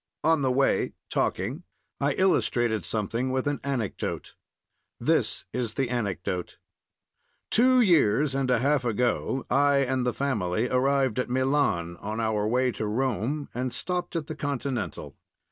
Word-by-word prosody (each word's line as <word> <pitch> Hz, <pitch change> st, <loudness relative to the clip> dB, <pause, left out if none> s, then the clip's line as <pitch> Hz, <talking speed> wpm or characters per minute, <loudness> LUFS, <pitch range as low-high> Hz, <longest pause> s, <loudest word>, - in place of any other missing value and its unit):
On 160 Hz, -1 st, +3 dB
the 130 Hz, -2 st, +2 dB
way, 135 Hz, +2 st, +2 dB, 0.2 s
talking, 140 Hz, +8 st, -1 dB, 0.4 s
I 140 Hz, 0 st, +1 dB
illustrated 120 Hz, -, +1 dB
something 110 Hz, +7 st, -1 dB
with 130 Hz, 0 st, -1 dB
an 145 Hz, -3 st, -1 dB
anecdote. 130 Hz, -7 st, -3 dB, 0.7 s
This -, -, +1 dB
is 120 Hz, -4 st, -2 dB
the 130 Hz, -3 st, -1 dB
anecdote: 95 Hz, -6 st, -3 dB, 0.9 s
Two 255 Hz, +2 st, +5 dB
years 150 Hz, -, +3 dB
and 135 Hz, -1 st, 0 dB
a 125 Hz, -, +4 dB
half 140 Hz, +2 st, +2 dB
ago 125 Hz, +3 st, 0 dB
I 140 Hz, +2 st, +3 dB
and 130 Hz, 0 st, 0 dB
the 125 Hz, -, +1 dB
family 110 Hz, -5 st, -1 dB
arrived 130 Hz, -2 st, +2 dB
at 125 Hz, -, -1 dB
Milan 125 Hz, -, +1 dB
on 105 Hz, +4 st, -5 dB
our 110 Hz, -2 st, 0 dB
way 125 Hz, +2 st, +2 dB
to 110 Hz, -1 st, -4 dB
Rome, 130 Hz, +5 st, -1 dB
and 125 Hz, +1 st, -2 dB
stopped 180 Hz, -1 st, -3 dB
at 165 Hz, -3 st, -1 dB
the 155 Hz, -, -6 dB
Continental. 140 Hz, -3 st, -3 dB
130 Hz, 145 wpm, -27 LUFS, 110-140 Hz, 0.9 s, Two